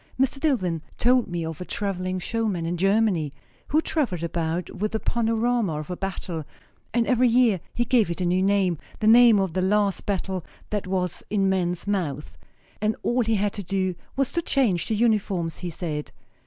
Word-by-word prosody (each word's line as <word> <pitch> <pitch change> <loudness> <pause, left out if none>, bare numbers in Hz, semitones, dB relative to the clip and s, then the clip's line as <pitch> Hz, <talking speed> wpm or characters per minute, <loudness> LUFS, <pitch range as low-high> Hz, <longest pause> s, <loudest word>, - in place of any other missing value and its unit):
Mr. 270 +1 +1
Dillwyn 185 - 0 0.2
told 250 0 +3
me 170 -2 -3
of 160 +1 -6
a - - -1
travelling 185 -1 -2
showman, 200 -2 -1
in 170 +1 -1
Germany, 195 -4 +2 0.4
who 310 +2 +3
travelled 245 - -1
about 170 +1 -2
with 210 +3 -2
the 220 - 0
panorama 230 -7 0
of 155 +4 -7
a - - -2
battle; 175 -4 -4 0.5
and 235 -1 +2
every 250 0 +3
year 235 -5 +4 0.2
he 240 - +1
gave 230 -6 +3
it 170 - -3
a 180 - 0
new 180 +1 +2
name, 190 -4 +2 0.2
the 215 - -1
name 230 0 +7
of 190 -4 -1
the 185 - 0
last 200 +1 +1
battle 190 -2 -2 0.3
that 210 -3 -2
was 185 -2 -1
in 200 -2 +2
men's 180 -2 0
mouths; 165 -8 -2 0.5
and 215 0 +1
all 245 +1 +2
he 225 -1 +1
had 205 0 0
to 205 - -5
do 190 -1 -1 0.2
was 270 -2 0
to 340 - 0
change 230 - +1
the 220 - 0
uniforms, 200 -7 0
he 180 - -4
said. 155 -3 -4
195 Hz, 190 wpm, -25 LUFS, 175-225 Hz, 0.5 s, name